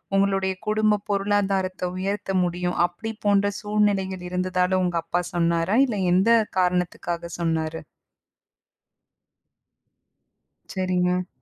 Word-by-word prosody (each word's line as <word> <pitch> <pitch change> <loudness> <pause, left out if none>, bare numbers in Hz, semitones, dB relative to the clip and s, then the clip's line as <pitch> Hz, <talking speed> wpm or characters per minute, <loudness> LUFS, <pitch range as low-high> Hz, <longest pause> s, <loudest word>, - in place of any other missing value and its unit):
உங்களுடைய 195 -1 +2
குடும்ப 215 0 +2
பொருளாதாரத்த 195 -2 0
உயர்த்த 195 +1 -3
முடியும். 180 0 -2
அப்படி 180 +6 -6 0.2
போன்ற 205 0 +3
சூழ்நிலைகள் 200 -3 0
இருந்ததால, 185 0 0
உங்க 175 -1 0
அப்பா 175 +2 -1
சொன்னாரா? 170 +2 +1
இல்ல 235 -6 -3 0.2
எந்த 190 +5 +3 0.3
காரணத்துக்காக 175 -1 -1
சொன்னாரு? 160 -1 -1 3.0
சரிங்க. 180 -1 0
185 Hz, 90 wpm, -24 LUFS, 180-200 Hz, 3.0 s, போன்ற